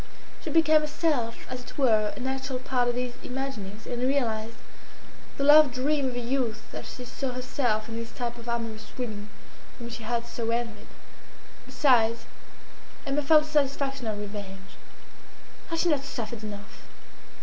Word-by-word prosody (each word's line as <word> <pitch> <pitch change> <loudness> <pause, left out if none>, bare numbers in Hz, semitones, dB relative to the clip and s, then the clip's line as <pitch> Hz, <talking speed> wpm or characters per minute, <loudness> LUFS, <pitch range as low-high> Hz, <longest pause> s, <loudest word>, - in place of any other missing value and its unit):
She - - -3
became 315 -1 +5
herself, 295 -6 0
as 255 0 -5
it - - -12
were, 220 -6 +4
an 255 - -4
actual 265 0 -2
part 250 -1 +1
of 240 - 0
these 250 0 -2
imaginings, 230 -6 -5
and 245 0 -3
realised 230 -4 0 0.8
the 275 - 0
love 295 -1 +8
dream 275 +2 +1
of 255 - -2
her - - -1
youth 235 -3 -2
as - - -6
she 250 - -7
saw 255 +1 -3
herself 245 -3 0
in 230 0 -5
this 230 0 -5
type 240 -1 -3
of 235 +1 -7
amorous 225 -2 -3
women 215 -4 -4 0.5
whom 235 -1 -7
she 230 0 -6
had 235 +1 -1
so 235 -1 -3
envied. 230 -2 -2 0.8
Besides, 230 -5 +3 0.8
Emma 280 +1 +1
felt 300 +2 +6
a - - -9
satisfaction 275 -3 0
of 215 -1 -1
revenge. 200 -2 -7 1.0
Had 330 - -1
she 345 - +3
not 290 -3 +2
suffered 235 -4 -5
enough? 205 -1 -8
245 Hz, 160 wpm, -28 LUFS, 225-275 Hz, 1.0 s, love